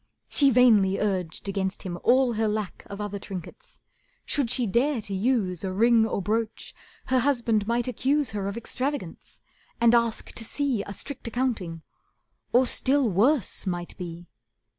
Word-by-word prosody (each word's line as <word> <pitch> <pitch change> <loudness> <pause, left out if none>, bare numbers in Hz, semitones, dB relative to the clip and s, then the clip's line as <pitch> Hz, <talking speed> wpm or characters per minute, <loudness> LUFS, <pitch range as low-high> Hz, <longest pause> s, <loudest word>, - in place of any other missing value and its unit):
She 280 -2 +4
vainly 220 -6 +5
urged 185 -4 -2
against 195 -1 -2
him 175 -2 -5
all 255 0 +4
her 220 0 0
lack 210 -2 -4
Of 200 - -8
other 205 -1 -4
trinkets. 190 -3 -9 0.4
Should 280 -6 0
she 245 0 0
dare 245 +6 +1
to 205 -2 -6
use 195 -4 0
A 190 - -2
ring 225 +3 +4
or 200 - -2
brooch 220 +3 -2 0.3
her 260 0 +2
husband 235 -5 +1
might 235 +1 0
accuse 270 +2 0
Her 200 -2 -3
of 200 +3 -4
extravagance, 250 - -5 0.4
and 235 0 +5
ask 235 -1 +1
to 230 - -3
see 265 -2 -1
A 200 - -6
strict 265 +4 -6
accounting, 220 -10 -2 0.7
or 250 +2 +5
still 265 -1 +2
worse 225 - +2
might 175 -1 -4
be. 175 -1 -7
225 Hz, 160 wpm, -26 LUFS, 195-250 Hz, 0.7 s, vainly